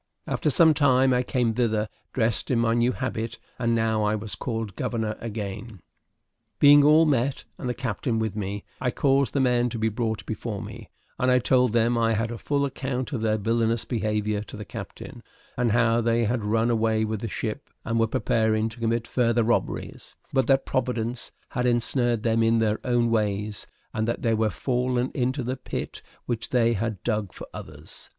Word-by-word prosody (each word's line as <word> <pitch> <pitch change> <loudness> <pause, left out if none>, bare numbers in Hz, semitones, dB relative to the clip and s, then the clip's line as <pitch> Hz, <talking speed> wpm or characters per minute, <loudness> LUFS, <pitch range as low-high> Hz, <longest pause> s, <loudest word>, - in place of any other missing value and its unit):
After - - 0
some 160 +2 +6
time, 130 -3 +4
I 125 - +3
came 125 -2 0
thither 110 -2 +1 0.2
dressed 115 -3 0
in 125 - +2
my 115 -1 +2
new 120 +1 +2
habit; 115 -3 -4 0.2
and 115 -1 +1
now 110 -1 +1
I 105 +1 +1
was 105 -1 -5
called 110 -2 -4
governor 110 -3 -2
again. 105 -1 -6 0.8
Being 145 0 +7
all 155 +2 +6
met, 135 -2 +1 0.2
and 125 - -3
the 125 - -2
captain 115 -1 -2
with 110 -2 -1
me, 100 -1 -4 0.2
I 125 - 0
caused 135 +1 +2
the 140 - +1
men 125 -2 +2
to 115 - -5
be 110 0 +1
brought 110 0 -2
before 110 -1 -4
me, - - -9 0.3
and 125 - +2
I 125 - +5
told 125 -1 +3
them 120 0 +2
I 115 -1 +2
had 115 +2 -1
a 115 - -6
full 140 -1 0
account 130 -1 -3
of 120 - -2
their 110 -1 +1
villanous 115 +1 0
behavior 105 -2 -1
to 105 - -9
the 105 - -7
captain, - - -9 0.3
and 120 -2 +1
how 120 0 +3
they 115 0 +2
had 115 0 0
run 115 +3 +2
away 110 -1 +1
with 110 -1 -3
the 115 - -3
ship, 110 +5 -4 0.2
and 115 0 0
were 115 - +3
preparing 110 0 +1
to 120 - -12
commit 115 0 0
further 120 -2 +2
robberies, 120 +2 -2 0.2
but 130 -1 +2
that 135 -1 +3
Providence 120 -1 -2 0.2
had 125 -1 -1
ensnared 120 -1 +1
them 115 0 +2
in 115 0 +3
their 110 -1 +1
own 120 -2 +1
ways, 105 -2 -1 0.3
and 110 0 -1
that 115 - -2
they 115 -2 +2
were 110 0 +2
fallen 125 +2 -1
into 130 +1 -1
the 130 +2 -3
pit - - -5 0.2
which 120 -2 -3
they 120 -2 +3
had 110 -3 -3
dug 105 -4 -1
for - - -9
others. - - -10
115 Hz, 195 wpm, -25 LUFS, 110-125 Hz, 0.8 s, Being